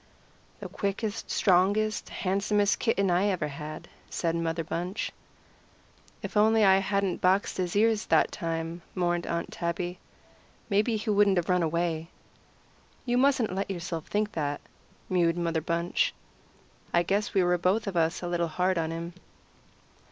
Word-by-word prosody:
"The - - -5
quickest, 205 +2 -3
strongest, 205 +3 +2
handsomest 200 +2 +1
kitten 200 -5 +1
I 180 +4 +3
ever 180 -7 -1
had," 150 +2 -7 0.2
said 165 -1 -1
Mother 165 0 -1
Bunch. 175 +5 -3 1.1
"If - - -6
I - - +5
only 220 +1 +4
hadn't 195 -1 +2
boxed 190 +2 +2
his 180 -1 -2
ears 220 0 +2
that - - +3
time," 165 -1 -4
mourned 175 -1 0
Aunt 170 - -2
Tabby, 175 +1 -3 0.7
"maybe 215 +3 +2
he 215 +1 -2
wouldn't 200 -2 +4
have 175 0 0
run 180 -1 +3
away." 165 0 -1 1.0
"You 245 0 +2
mustn't 260 -7 +2
let 195 +1 -2
yourself 170 -3 -4
think 210 0 0
that," 145 -2 -2 0.5
mewed 175 -2 +2
Mother 165 -2 0
Bunch. 170 +2 0 0.8
"I 175 - +3
guess 200 +4 -1
we 190 - +4
were 175 0 +2
both 190 +5 +1
of 200 -3 -4
us 165 +1 +1
a - - -2
little 170 -1 0
hard 180 +2 0
on 160 -1 -1
him." 165 +1 -5
180 Hz, 150 wpm, -28 LUFS, 170-205 Hz, 1.1 s, I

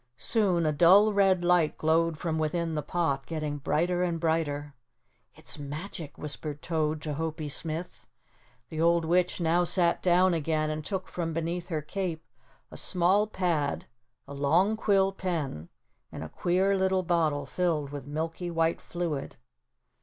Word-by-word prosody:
Soon 190 -7 +2
a 155 - +3
dull 190 +8 +6
red 190 -3 +3
light 175 -3 +3
glowed 160 +1 +2
from 160 -1 -2
within 165 +1 -1
the 150 - -1
pot, 140 -3 -1
getting 155 -3 -3
brighter 175 +5 0
and 170 -2 0
brighter. 150 -3 -1 0.6
"It's - - -4
magic," 150 +2 -7
whispered 150 0 -6
Toad 155 -2 -1
to 150 - -3
Hopie 155 -1 -4
Smith. 165 +4 -3 0.6
The 160 -1 -3
old 170 0 +3
witch 180 +2 +1
now 170 +1 +2
sat 175 -1 +2
down 180 0 +4
again 155 -1 0
and 155 0 -4
took 190 +2 -3
from 165 -2 -3
beneath 170 +2 -3
her 155 -4 -3
cape 170 -1 -4 0.5
a - - -8
small 190 +3 +2
pad, 170 -8 -1 0.4
a 140 - -8
long 165 +10 +2
quill 195 -3 +2
pen 160 - -4 0.4
and - - -6
a 80 - -7
queer 185 - +1
little 190 -1 +1
bottle 160 -5 +1
filled 150 -1 -1
with 145 -2 -7
milky 165 +4 -3
white 165 0 0
fluid. 170 -5 -4
165 Hz, 155 wpm, -28 LUFS, 155-180 Hz, 0.6 s, dull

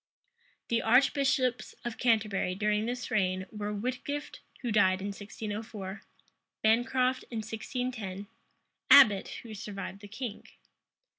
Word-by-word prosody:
The 230 -1 +2
archbishops 260 +1 +2
of 240 -1 -4
Canterbury 215 -6 +1
during 210 +2 +1
this 245 -1 -4
reign 185 -3 +1
were 210 -1 -4
Whitgift, 255 +7 -4 0.2
who 240 - -1
died 190 -3 +4
in 200 +2 -3
1604; 205 0 -6 0.6
Bancroft, 250 +3 +2
in 230 - -5
1610; 220 -3 -4 0.6
Abbot, 210 -9 +8 0.2
who 225 -2 -9
survived 195 -1 -6
the 205 - -9
king. 220 +1 -6
220 Hz, 115 wpm, -30 LUFS, 205-245 Hz, 0.6 s, Abbot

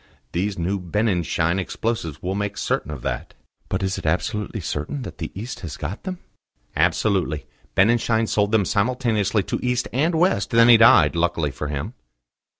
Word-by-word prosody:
These 95 +3 -1
new 95 +4 -1
Benninschein 90 -2 0
explosives 95 -6 -3
will 90 +1 -1
make 100 0 -3
certain - - -1
of 75 -5 -6
that." - - -4 0.3
"But 95 +1 -1
is 95 0 -1
it - - -10
absolutely 105 +6 -1
certain 85 - -4
that - - -9
the 80 - -4
East 115 +4 -6
has 80 -7 -7
got 90 - -6
them?" 185 -1 -4 0.6
"Absolutely. 90 -8 +1 0.3
Benninschein 115 +2 +3
sold 105 -1 +1
them 110 -3 +3
simultaneously 110 -2 +1
to - - -3
East 125 0 0
and 155 +7 +1
West; 165 - +2
then 115 +1 +5
he 120 - +9
died, 115 -3 +6
luckily 85 -3 0
for 75 +3 -5
him." 70 -1 -4
100 Hz, 165 wpm, -23 LUFS, 85-115 Hz, 0.6 s, he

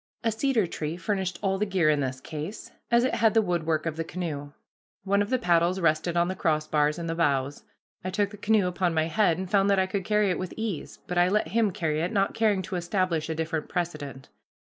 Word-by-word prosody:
A 225 - +2
cedar 230 -1 +1
tree 160 -1 -4
furnished 185 +1 -2
all 195 -1 +1
the 210 - +2
gear 185 -5 +2
in 150 -1 +3
this 130 -1 -2
case, 155 +8 -7 0.2
as 235 0 +4
it 255 - +1
had 225 -1 +3
the 225 - +6
woodwork 165 -4 0
of 160 -1 -3
the 165 - -1
canoe. 155 -4 -5 0.5
One 200 +1 +2
of 205 - -1
the 255 - +2
paddles 175 -4 +2
rested 165 +1 +1
on 170 0 +3
the 185 - -3
crossbars 155 -3 +1
in 170 - -4
the 165 - -2
bows. 140 -4 0 0.4
I 185 - -2
took 200 +1 0
the 210 - -10
canoe 210 -1 +2
upon 180 -1 0
my 160 0 +2
head 165 0 +2
and 190 +1 -4
found 200 +1 +3
that 200 - +4
I 190 - +3
could 195 0 -3
carry 210 -1 +2
it 180 - -2
with 185 - -5
ease, 220 -8 -4
but 180 0 -1
I 175 +1 +4
let 205 -4 +1
him 220 +2 +2
carry 160 -4 -1
it, 170 - -1
not 195 -2 +1
caring 210 -4 +2
to 180 0 -4
establish 175 -3 -1
a 160 - -1
different 160 -1 -3
precedent. 150 -6 -4
180 Hz, 235 wpm, -27 LUFS, 160-200 Hz, 0.5 s, the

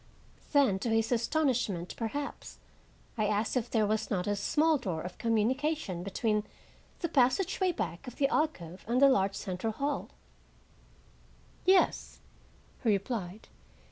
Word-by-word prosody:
Then, 270 -10 +4
to 230 - -2
his 225 +1 +1
astonishment, 240 - 0
perhaps, 280 +6 -5 0.6
I 215 - +2
asked 210 +3 0
if 245 -1 0
there 220 -2 +2
was 215 +1 -1
not 180 -3 -1
a 205 - 0
small 305 +9 +2
door 175 -9 -3
of 180 0 -8
communication 230 - 0
between 210 +3 0 0.6
the 340 - 0
passageway 325 +8 +2
back 215 - -4
of 250 - -7
the 275 - +2
alcove 185 - -1
and 240 +2 +2
the 280 - +8
large 195 -7 +2
central 195 +3 -3
hall. 280 +4 -2 1.6
"Yes," 375 0 +3 0.6
he 235 - +1
replied. 200 -1 -2
225 Hz, 135 wpm, -30 LUFS, 200-275 Hz, 1.6 s, the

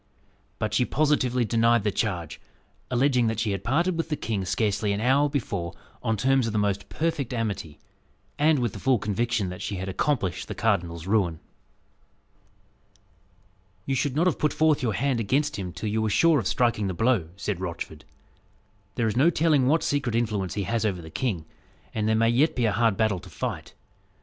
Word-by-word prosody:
But 110 - -2
she 125 - +3
positively 130 -4 +1
denied 115 0 +3
the 105 - +1
charge, 90 -7 -3 0.5
alleging 125 -1 +2
that 110 0 -1
she 110 -3 0
had 100 -1 -3
parted 165 - +1
with 165 0 -2
the 150 - 0
king 105 -8 -3
scarcely 100 +2 0
an 100 - -2
hour 135 +5 +3
before 100 - -3 0.3
on 110 -1 0
terms 130 +2 +2
of 110 - -3
the - - 0
most 100 -1 -1
perfect 155 -6 -2
amity, 100 -9 -3 0.6
and 155 +1 +4
with 120 -5 -1
the - - -7
full 130 -2 +3
conviction 105 0 -1
that 90 - -7
she 100 - -3
had 95 +1 -4
accomplished 95 -2 -1
the - - -5
cardinal's 85 -1 0
ruin. 95 -6 +1 2.5
"You 135 - -1
should 135 +1 0
not 165 +4 +2
have 180 - +1
put 150 - +1
forth 155 -1 +3
your 115 -4 0
hand 130 +4 0
against 130 +3 0
him 90 -2 -4
till 105 - -4
you 110 +1 0
were 110 - 0
sure 160 +7 +4
of 105 - -2
striking 120 -5 +1
the 95 - -3
blow," 115 -6 +1
said 100 -2 -3
Rochford. 90 -3 -6 0.9
"There 120 - 0
is 110 - 0
no 140 +7 +5
telling 155 -5 +3
what 160 +4 +3
secret 140 -5 0
influence 105 -6 -1
he 100 - -1
has 115 +3 -1
over 100 -5 0
the 80 - -10
king; 95 -10 -2 0.5
and 110 -1 -1
there 110 - +3
may 115 +1 +3
yet 135 +7 +3
be 125 - +1
a 110 - +2
hard 115 -2 +2
battle 110 -4 +1
to 90 +1 -13
fight. - - -5
115 Hz, 195 wpm, -26 LUFS, 100-135 Hz, 2.5 s, no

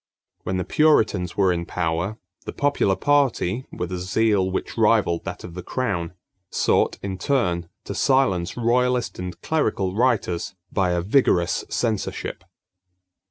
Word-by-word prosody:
When 95 - -2
the 90 - -1
Puritans 110 - +2
were 95 -3 +4
in 85 -1 -4
power, 85 +4 -2 0.3
the - - -4
popular 140 -9 +1
party, 135 -5 +1
with 90 0 -5
a 90 - -3
zeal 95 +1 +1
which 95 - -3
rivaled 85 0 +2
that - - -6
of 85 - -8
the 90 - -6
crown, 90 -7 -2 0.4
sought, - - +1
in 95 -1 -4
turn, 90 -10 0
to - - -5
silence 125 -10 +1
royalist 125 0 +1
and 90 0 -6
clerical 105 -12 0
writers 105 -7 0 0.2
by 95 -3 +1
a 85 -1 0
vigorous 90 -5 +2
censorship. 110 -4 -2
95 Hz, 140 wpm, -23 LUFS, 90-125 Hz, 0.4 s, were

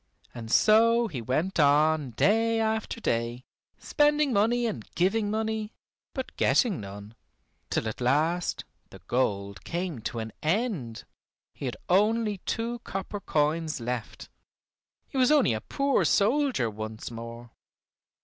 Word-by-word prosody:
And 115 -2 -8
so 230 +2 +5
he 140 - -5
went 155 - -1
on 150 0 +4
day 225 - +2
after 220 +1 -1
day, 120 - -2 0.3
spending 295 -2 +2
money 230 +4 +2
and 220 - -3
giving 205 +4 +1
money, 220 0 -2 0.4
but 260 -1 -5
getting 215 - +2
none, 100 +2 -9 0.6
till - - -1
at 110 - -5
last 155 +8 +1 0.2
the - - -12
gold 100 -6 -1
came 170 -5 -3
to 115 - -4
an 110 -1 -4
end. 160 - -1 0.5
He - - -7
had 125 - -3
only 210 +2 +2
two 235 +1 -2
copper 195 -1 -5
coins 155 -2 0
left: 120 -1 -5 0.8
he 270 - -3
was 255 +2 +4
only 290 - +4
a 110 - -3
poor 275 - +1
soldier 250 - +2
once 110 +1 -6
more. 115 +1 -8
175 Hz, 130 wpm, -27 LUFS, -, 0.8 s, so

